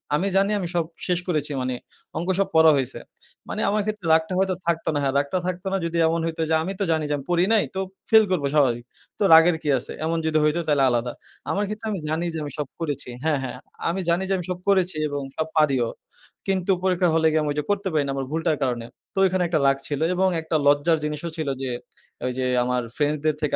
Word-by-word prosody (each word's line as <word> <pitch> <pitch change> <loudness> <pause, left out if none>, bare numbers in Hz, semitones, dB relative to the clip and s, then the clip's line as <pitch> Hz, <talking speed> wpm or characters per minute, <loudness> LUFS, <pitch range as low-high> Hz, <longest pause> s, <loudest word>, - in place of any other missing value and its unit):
আমি 185 +6 0
জানি 195 +2 +3
আমি 175 - -3
সব 170 -2 +2 0.2
শেষ 180 -2 +1
করেছি 155 -4 -1
মানি 125 0 -2 0.4
অংক 170 - -3
সব 195 - +2
পড়া 160 0 +7
হইছে। 130 -3 -2 0.5
মানি - - -3
আমার 210 +1 +1
ক্ষেত্রে 215 -3 -4
রাগটা 160 +3 +2
হয়তো 190 -1 +1
থাকতো 165 -1 0
না। 145 - 0
হ্যাঁ, 135 - +1
রাগটা 145 +6 0
থাকতো 185 +1 -3
না - - +2
যদি 170 0 -2
এমন 165 +1 +1
হইত 165 0 -4
যে, 160 - +2
আমি 190 +4 -3
তো - - +1
জানি 160 -1 +1
যে, - - +1
আমি 135 - -9
পড়ি 175 +1 +3
নাই 215 - +4
তো - - -1 0.3
ফেইল 220 -1 +7
করব 175 -6 +1
স্বাভাবিক। 125 -5 +3 0.4
তো - - +2
রাগের 165 +1 +7
কি 150 - -1
আছে? 130 - -6
এমন 165 +1 0
যদি 155 0 +2
হইতো 150 +3 +2
তাহলে 145 -2 +3
আলাদা। 120 0 0 0.4
আমার 205 - 0
ক্ষেত্রে 215 +1 -5
আমি 200 - -2
জানি 160 +3 -1
যে, 160 - -3
আমি 145 - -5
সব 145 - -2
করেছি 145 -6 -3
হ্যাঁ, 155 -3 +1
হ্যাঁ। 125 - -5 0.3
আমি 180 +3 -1
জানি 175 +3 +2
যে, - - +2
আমি 175 - -5
সব 180 0 -3
করেছি 185 -4 +2
এবং 145 0 -3 0.2
সব 160 - -1
পারিও। 135 -6 +3 0.6
কিন্তু 190 -1 +1
পরীক্ষা 180 -2 +2
হলে 160 0 +4
গিয়ে 155 - +2
আমি 150 - -1
ওইযে 150 0 -2
করতে 200 -1 -1
পারি 150 -2 +2
না - - -1
আমার 135 - -2
ভুলটার 160 -1 0
কারণে। 120 -3 -1 0.3
তো - - -17
ঐখানে 185 -1 +1
একটা 165 -2 +1
রাগ 135 0 +4
ছিল 145 -2 -2 0.2
এবং 190 +1 +3
একটা 160 0 -3
লজ্জার 145 +3 +4
জিনিসও 150 +2 -3
ছিল 155 - -3
যে, 135 - -2 0.6
ওইযে 130 0 -2 0.2
আমার 125 0 0
ফ্রেন্ডসদের 150 0 0
থেকে 150 - 0
160 Hz, 235 wpm, -24 LUFS, 145-180 Hz, 0.6 s, পড়া